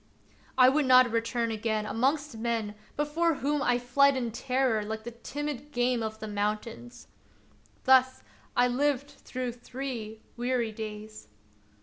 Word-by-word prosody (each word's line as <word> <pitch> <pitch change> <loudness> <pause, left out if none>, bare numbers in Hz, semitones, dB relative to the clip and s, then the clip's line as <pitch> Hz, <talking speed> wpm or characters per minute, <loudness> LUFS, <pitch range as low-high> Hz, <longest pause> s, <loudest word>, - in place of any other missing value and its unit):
I 255 -1 +8
would 280 +1 +3
not 255 -2 +7
return 230 0 0
again 220 -1 -1
amongst 275 +5 0
men 225 -2 -2 0.2
before 315 +3 +1
whom 290 +1 0
I 245 -2 +3
fled 265 +3 +3
in 240 -3 -2
terror 250 -1 0
like 220 +1 -5
the 240 - -6
timid 290 +4 -5
game 245 -2 +1
of 220 -1 -3
the 215 - -6
moun 210 +1 0
tains. 235 +2 -11 0.8
Thus 260 0 +4 0.3
I 245 - +5
lived 280 +2 0
through 255 -3 -5
three 240 -3 -6
weary 240 -2 0
days. 215 0 -8
245 Hz, 140 wpm, -29 LUFS, 220-265 Hz, 0.8 s, I